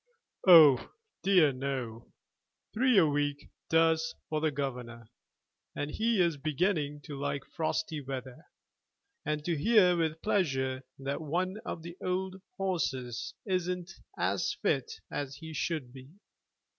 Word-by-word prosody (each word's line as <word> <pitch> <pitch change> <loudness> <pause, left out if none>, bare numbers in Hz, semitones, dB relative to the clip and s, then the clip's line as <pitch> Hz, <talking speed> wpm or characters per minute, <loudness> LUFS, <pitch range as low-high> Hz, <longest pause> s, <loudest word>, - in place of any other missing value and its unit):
"Oh 155 -8 +8 0.3
dear 180 -7 +5
no; 130 -4 -4 0.6
three 250 +1 +3
a 180 - +7
week 145 -1 -1 0.2
does 160 0 +3
for 155 -1 -1
the 155 - +2
governor, 125 -5 -5 0.6
and 145 +1 -3
he 225 +2 +1
is 170 -4 +3
beginning 150 0 -1
to 145 +1 -8
like 140 -1 -2
frosty 160 -2 -2
weather, 130 -2 -7 0.8
and 150 0 -2
to 170 - +1
hear 180 +2 +5
with 160 -1 -1
pleasure 135 -10 0 0.2
that 140 +3 -3
one 180 +6 -1
of 160 - -5
the 170 +1 -9
old 185 +1 -2 0.2
horses 135 -11 -2
isn't 180 -2 -2 0.3
as - - 0
fit 455 - +1 0.2
as 140 -1 -4
he 160 +2 -9
should 150 -5 -2
be. 130 0 -12
155 Hz, 130 wpm, -30 LUFS, 135-180 Hz, 0.8 s, Oh